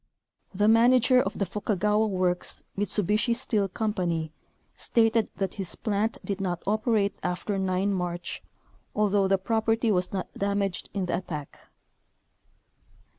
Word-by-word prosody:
The 205 +2 +1
manager 250 +3 +5
of 195 - -3
the 200 - 0
Fukagawa 210 +2 0
works, 185 -2 0
Mitsubishi 210 +3 +1
Steel 215 -5 +1
company, 180 -6 -2 0.4
stated 225 -1 +2
that 195 -2 -2
his 195 -3 -3
plant 215 +1 -1
did 200 -1 -3
not 175 -3 -2
operate 215 -1 +1
after 195 +3 -2
9 190 +1 0
March, 175 -1 -3 0.5
although 205 -2 +2
the 195 0 +3
property 225 +3 +1
was 180 -2 +1
not 190 -2 -4
damaged 200 -2 -2
in 195 -2 0
the 175 - -1
attack. 150 -6 -7
200 Hz, 125 wpm, -27 LUFS, 185-220 Hz, 0.5 s, manager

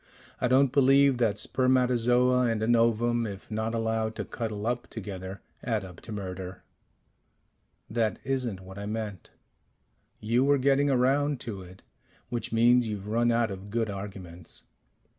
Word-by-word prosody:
I 125 - +1
don't 130 +1 +4
believe 135 -1 +4
that 110 -4 +2
spermatozoa 125 +1 +2
and 110 -1 -1
an 120 +2 +3
ovum, 115 0 +2
if 100 +1 -9
not 110 +1 -2
allowed 110 -1 -1
to - - -4
cuddle 110 -3 -4
up 120 +1 -1
together, 95 -3 -7 0.2
add 110 -5 -1
up 90 -2 -12
to - - -10
murder." 95 -2 -6 1.2
"That 110 -3 0
isn't 125 -8 -2
what 95 +1 -10
I 100 - -5
meant 105 -4 -5 0.5
" - - -45 0.3
"You 115 +4 +1
were 140 +1 +4
getting 140 +2 +3
around 135 +2 +2
to 105 -5 -5
it 90 +1 -14 0.5
which 120 -3 -3
means 120 +1 +4
you've 105 -1 -5
run 120 +2 +2
out 115 -2 +1
of 95 +1 -8
good 110 -1 -1
arguments." 95 -4 -9
115 Hz, 155 wpm, -28 LUFS, 100-125 Hz, 1.2 s, don't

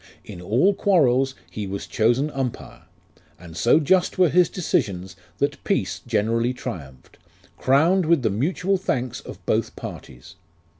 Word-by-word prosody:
In 85 - -9
all 125 - +2
quarrels 135 -10 +2 0.2
he 105 -2 -5
was 100 +1 -5
chosen 120 +7 +1
Umpire 130 -4 -5 0.5
And 85 -2 -12
so 120 - +4
just 180 +4 +2
were 180 -2 +4
his 180 +3 +4
decisions, 95 - -2 0.2
That 140 - -2
peace - - -1
generally 115 +4 0
triumphed, 80 - -9 0.4
Crowned 160 +7 +3
with 165 -5 +3
the 110 - +1
mutual 180 - 0
thanks 130 -9 -2
of - - -12
both - - 0
parties. 60 0 -10
130 Hz, 140 wpm, -23 LUFS, 105-165 Hz, 0.5 s, so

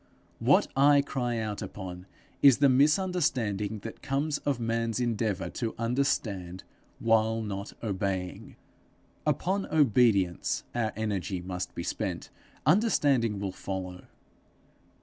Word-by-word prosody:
What - - +4
I 140 +1 +5
cry 125 -4 -2
out 110 -2 -3
upon 95 -2 -7 0.3
is 140 -4 +7
the 140 -1 +5
misunderstanding 130 - +1
that 115 - -8
comes 145 +2 -1
of 140 -4 -1
man's 115 0 -1
endeavour 110 -5 -1
to 115 -3 -3
understand 110 -7 -1 0.3
while 115 0 +2
not 100 -1 -5
obeying. 95 -3 -3 0.7
Upon 195 +2 0
obedience 115 - +2
our 115 -2 0
energy 100 -3 -2
must 90 0 -5
be 85 - -4
spent; - - -4 0.3
understanding 145 - +3
will 100 -1 -3
follow. 90 -1 -6
115 Hz, 110 wpm, -28 LUFS, 100-135 Hz, 0.7 s, is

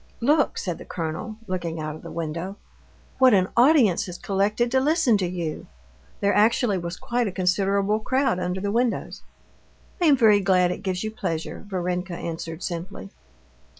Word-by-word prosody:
"Look," 290 +4 +2
said 175 -3 -3
the - - -8
colonel, 165 +6 -4
looking 175 -4 -3
out 155 -1 -4
of - - -11
the - - -9
window, 170 +4 -4 0.6
"what 260 -4 +6
an 185 -1 +2
audience 240 - +4
has 180 -1 -7
collected 210 +5 0
to 265 - +3
listen 290 -4 +3
to 185 - 0
you." 170 -3 -4 0.5
There 200 0 +2
actually 215 -1 +3
was 170 +1 -5
quite 240 -1 -1
a - - -2
considerable 195 +3 +1
crowd 260 -3 0
under 180 +1 -2
the 200 +1 -2
windows. 235 +1 -1 0.8
"I - - +3
am 285 -3 +6
very 215 -4 +5
glad 185 -2 +3
it - - -5
gives 185 0 -2
you 215 - -3
pleasure," 165 -7 -4
Varenka 180 -1 -3
answered 165 0 -6
simply. 170 - -6
190 Hz, 170 wpm, -24 LUFS, 175-225 Hz, 0.8 s, what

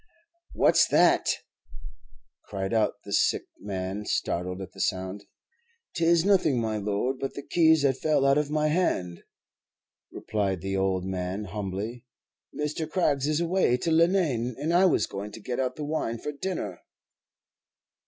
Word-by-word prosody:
"What's - - +4
that?" - - +4 1.2
cried 95 +1 -4
out 110 -2 +2
the - - -6
sick - - +2 0.2
man, 95 0 -4
startled 90 +2 -2
at 95 -1 -7
the - - -8
sound. 95 +1 -2 0.7
"'Tis 170 0 +3
nothing, 180 -10 +3
my 110 -2 -1
lord, 105 +6 -1
but 135 - -4
the 140 - -6
keys 160 -3 +4
that 135 -2 +2
fell 155 -3 +2
out 140 +1 +4
of 150 -1 -2
my 155 0 +1
hand," 90 - 0 0.9
replied 100 -4 -2
the 95 +1 -3
old 95 -1 0
man, 95 +2 -3
humbly. 105 +5 -5 0.4
"Mr. 150 +1 -3
Craggs 145 -6 +1
is 155 +2 +1
away 170 -7 +2
to 165 - -2
Leenane, 160 -8 +2
and 155 +5 -1
I 180 +2 +5
was 145 - +3
going 100 +2 -6
to - - -8
get 120 +4 -4
out 130 -1 -1
the 150 - -5
wine 145 -6 -2
for 150 - -5
dinner." 140 - -4
125 Hz, 155 wpm, -27 LUFS, 100-155 Hz, 1.2 s, I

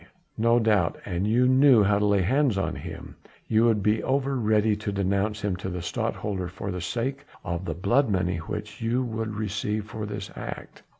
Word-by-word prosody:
"No 115 +1 +4
doubt, 105 -7 +2
an 90 0 -2
you 120 +4 +3
knew 130 -3 +6
how 100 +1 +3
to 105 - +2
lay 100 -2 +3
hands 130 +2 +2
on 95 - -1
him; - - -8 0.3
you 110 +1 +3
would 110 -4 +2
be 105 +1 +2
over 135 +1 0
ready 110 -2 +2
to 105 -1 -3
denounce 100 +2 0
him 100 -3 -1
to 95 +1 -5
the 90 -2 -5
Stadtholder 95 +2 -2
for 95 +2 -5
the 90 -1 -4
sake 130 +9 -3 0.2
of 85 +1 -3
the 80 -3 -3
blood 120 - +2
money 90 -3 0
which 105 +6 -6
you 120 +3 +1
would 110 -2 -3
receive 105 0 -2
for 105 0 -6
this 100 -1 -6
act." - - -8
105 Hz, 195 wpm, -26 LUFS, 95-115 Hz, 0.3 s, knew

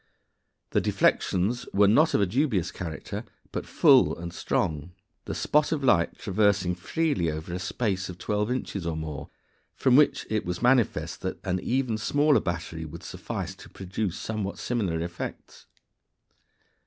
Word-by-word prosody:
The - - +2
deflections 105 +7 +1
were 100 0 +6
not 150 +11 +4
of - - +3
a - - +4
dubious 110 - 0
character, 80 -3 -6 0.3
but - - -4
full - - +5
and 85 0 -6
strong, 80 0 -1 0.3
the - - -4
spot 150 0 +2
of 150 -3 -1
light 85 -10 +3
traversing 100 -2 +2
freely 95 - 0
over 80 +3 -5
a 90 - -3
space 95 -1 -2
of 90 - -7
twelve 105 +3 -1
inches 100 -8 -3
or 80 -2 -2
more, 80 -3 -5 0.5
from 130 -2 +3
which 150 +1 +4
it 110 -1 -1
was 90 0 -3
manifest 125 -2 +2
that - - -4
an 95 -1 -1
even 120 0 0
smaller 145 +6 +3
battery 85 -2 -4
would 80 +2 -9
suffice - - -5
to - - -13
produce 95 0 -4
somewhat 105 -3 -3
similar 100 -9 -1
effects. 85 +1 -7
95 Hz, 155 wpm, -27 LUFS, 85-120 Hz, 0.5 s, were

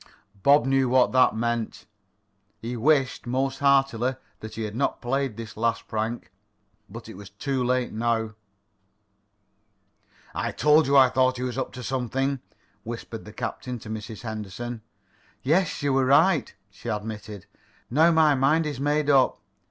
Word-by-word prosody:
Bob 140 +3 +5
knew 135 -1 +2
what 130 0 +4
that 130 -3 +4
meant. 120 0 -2 0.7
He 120 +2 -5
wished, 135 +1 +1
most 135 +2 -1
heartily, 135 -3 +2 0.2
that 110 0 -9
he 110 - -4
had 105 0 -5
not 135 +3 -1
played 130 -2 -2
this 115 -1 -8
last 115 +1 -1
prank. 110 -3 -3 0.6
But 115 +3 -10
it 110 - -9
was 100 0 -11
too 130 +6 -2
late 125 0 0
now. 110 -1 -1 2.0
"I - - -3
told 150 0 +4
you 140 0 +4
I 130 -2 +7
thought 130 0 +2
he 125 - -4
was 125 -1 -3
up 130 - -3
to 125 0 -8
something," 135 +2 -1 0.4
whispered - - -7
the - - -10
captain 125 -1 -5
to 110 -1 -9
Mrs. 110 0 -7
Henderson. 110 +2 -6 0.6
"Yes, 160 +2 +1
you 140 -2 +1
were 135 0 +3
right," 150 +3 +4 0.2
she 100 +4 -8
admitted. 105 -2 -5 0.5
"Now 160 +6 +5
my 160 -2 +4
mind 145 +4 +2
is 145 -3 -4
made 145 +1 0
up. 135 -3 +3
125 Hz, 155 wpm, -25 LUFS, 115-140 Hz, 2.0 s, I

